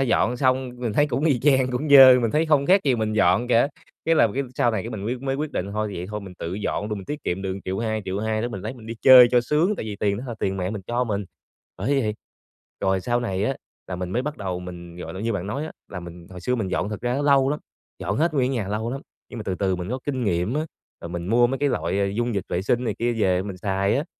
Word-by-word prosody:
dọn 125 -1 +2
xong 130 0 +1
mình 120 -3 -2
thấy 145 +7 +3
cũng 135 +1 -1
y 140 -7 +2
chang, 130 -2 +3
cũng 125 +5 -2
dơ, 135 -3 +10
mình 115 -2 +1
thấy 155 +5 +1
không 145 -3 +3
khác 195 +2 +5
gì 135 -3 +3
mình 110 -1 -1
dọn 105 +2 +3
cả. 120 +2 +4 0.4
Cái 165 - +3
là 135 - +5
cái 140 - 0
sau 120 - +2
này 110 -4 -2
cái - - -6
mình 100 -2 -5
quyết 125 +3 -3
mới 135 -1 -1
quyết 150 +1 -3
định, 100 +2 -3
thôi, 110 0 -1
vậy 90 +1 -5
thôi 105 0 -4
mình 95 -2 -10
tự 85 +2 -4
dọn 105 +1 -2
luôn, 105 -1 -3
mình 95 - -9
tiết 150 +6 -5
kiệm 90 +2 -2
được 95 -1 -3
1.200.000, 110 +3 -2
1.200.000 110 +3 -2
đó 120 - -1
mình 100 -5 -6
lấy 110 +6 -5
mình 115 -4 -13
đi 115 - -5
chơi 130 -2 +9
cho 125 -1 +4
sướng, 155 - +1
tại - - -4
vì 105 -2 -5
tiền 100 -1 0
đó 125 - -6
là 120 - -4
tiền 95 0 -1
mẹ 90 0 -2
mình 105 -2 -5
cho 120 +1 0
mình, 105 -3 -2 0.5
bởi 135 +9 +1
vậy. 105 -4 -1 0.7
Rồi 95 -1 +1
sau 120 +5 0
này 95 -4 -1
á, 135 +4 -1 0.3
là 90 - -5
mình 90 0 -4
mới 120 +6 0
bắt 150 +2 -4
đầu 95 -3 -4
mình, 85 -1 -9
gọi 85 -1 -7
là, 95 - -6
như 115 +2 -1
bạn 100 -3 -3
nói 135 +9 -3
á, 160 - -7 0.2
là 90 - -6
mình 85 0 -10
hồi 90 -1 -9
xưa 125 +8 0
mình 110 -6 -2
dọn 95 - -1
thật 105 -1 -5
ra 120 0 -1
nó 140 - -1
lâu 140 -2 +4
lắm, 150 - -2 0.4
dọn 100 +4 -2
hết 160 +3 +1
nguyên 130 -2 +2
cái 130 - -1
nhà 105 -4 -2
lâu 110 +3 -2
lắm, 135 - -4 0.3
nhưng 120 - -8
mà - - -4
từ 95 - -2
từ 95 0 0
mình 90 0 -5
có 130 - -2
kinh 130 -4 -2
nghiệm 90 +3 0
á, 155 +2 -1 0.3
rồi - - -7
mình 85 0 -5
mua 120 +4 +4
mấy 135 +2 -2
cái 145 - +2
loại 100 - -1
dung 120 0 0
dịch 100 - -1
vệ 90 +2 -1
sinh 120 +5 0
này - - -1
kia 120 +1 +1
về 95 -5 +1
mình 95 -2 -6
xài 100 +1 0
á. 145 - -1
110 Hz, 300 wpm, -24 LUFS, 95-130 Hz, 0.7 s, dơ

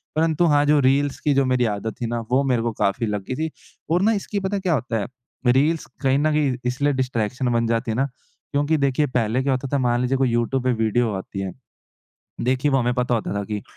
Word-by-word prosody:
परंतु 160 +1 +2
हाँ 145 0 +4
जो 150 0 +4
रील्स 140 +1 +1
की 150 - +1
जो 135 0 +3
मेरी 125 -1 +2
आदत 105 +2 -4
थी 120 - -1
ना 120 +1 -2
वो 135 +2 +3
मेरे 125 -4 +1
को 115 0 -1
काफ़ी 100 +4 +1
लग 105 -2 -2
गई 130 - -1
थी 160 - -5 0.4
और 175 +3 +2
ना 215 +3 +4
इसकी 205 0 -2
पता 190 +1 -2
है 195 - -2
क्या 185 -3 +1
होता 120 -4 -1
है 100 - -3 0.4
रील्स 145 +6 +3 0.2
कहीं 135 +1 +3
न 155 +1 +2
कहीं 150 -4 +1
इसलिए 140 +4 +1
डिस्ट्रैक्शन 125 -1 -1
बन 115 0 +1
जाती 115 +1 0
है - - -2
ना, 135 - +2 0.5
क्योंकि 145 +2 +1
देखिए 140 +1 +1
पहले 115 +2 +1
क्या 135 0 +1
होता 130 +1 -2
था - - +4
मान 120 -1 +1
लीजिए 130 +2 +1
कोई 130 -1 +2
यूट्यूब 120 +2 0
पे 130 - +2
वीडियो 115 +1 +1
आती 95 +1 -7
है 95 -1 -3 0.9
देखिए, 130 +4 +1
वो 135 - +3
हमें 125 -1 +1
पता 125 0 0
होता 110 -3 -2
था 100 - -1
कि 105 0 -4
130 Hz, 245 wpm, -22 LUFS, 115-145 Hz, 0.9 s, हाँ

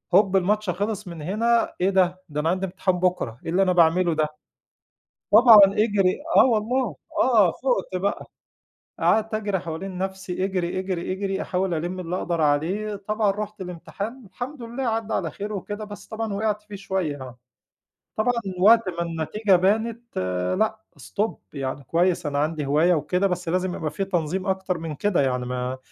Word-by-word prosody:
هوب، 195 -1 +5
الماتش 210 +2 +1
خلص 205 +2 -2
من 170 -3 -7
هنا 230 +7 +1
إيه 190 - +3
ده؟! 185 -1 +2
ده 150 0 -3
أنا 160 - +1
عندي 185 +2 0
امتحان 185 -1 -1
بُكرة، 180 -11 0
إيه 165 - -3
اللي 185 +3 +3
أنا 185 - +2
باعمله 170 0 +4
ده؟! 155 0 +1 1.1
طبعًا 220 -1 +9
اجري 200 -2 +1 0.2
آه - - +8
والله، 230 - 0 0.3
آه، 220 -8 +5
فُقت 240 -8 -1
بقى، 200 - -1 0.7
قعدت 220 0 +2
أجري 205 -3 -1
حوالين 180 +2 -6
نفْسي، 190 -1 -3
اجري، 185 -2 -2
اجري، 185 -1 -3
اجري، 195 0 -2
أحاول 185 -1 -1
ألِم 175 +3 -3
اللي 180 0 -3
أقدر 170 -2 -2
عليه، 170 +9 +1
طبعًا 210 +1 0
رُحت 210 0 -6
الامتحان، 195 +7 -6
الحمد 250 +8 -7
لله 240 +3 -5
عدَّى 225 -2 -1
على - - -1
خير 210 +1 -5
وكده، 205 +2 -5
بس 205 -1 -10
طبعًا 220 -1 -4
وقعت 210 +1 -1
فيه 210 -1 -10
شويّة 185 -8 -3
آه، 125 -1 -9 0.8
طبعًا 220 +3 +2 0.3
وقت 225 +1 +6
ما 170 -1 -4
النتيجة 170 +5 +1
بانت، 225 +6 0 0.4
لأ، 220 0 +1 0.2
stop، 215 +2 -2 0.2
يعني 135 -1 -4
كويّس 170 +3 +1
أنا 145 -1 -1
عندي 150 0 -1
هواية 155 +6 +3
وكده، 180 +4 +1
بس 180 -2 -3
لازم 185 +1 0
يبقى 155 -2 -3
في 195 +6 -2
تنظيم 180 0 -2
أكتر 190 -1 -1
من 160 -2 -5
كده 205 +1 +1
يعني. 125 -2 0
ما 125 +1 -3
190 Hz, 170 wpm, -24 LUFS, 170-210 Hz, 1.1 s, طبعًا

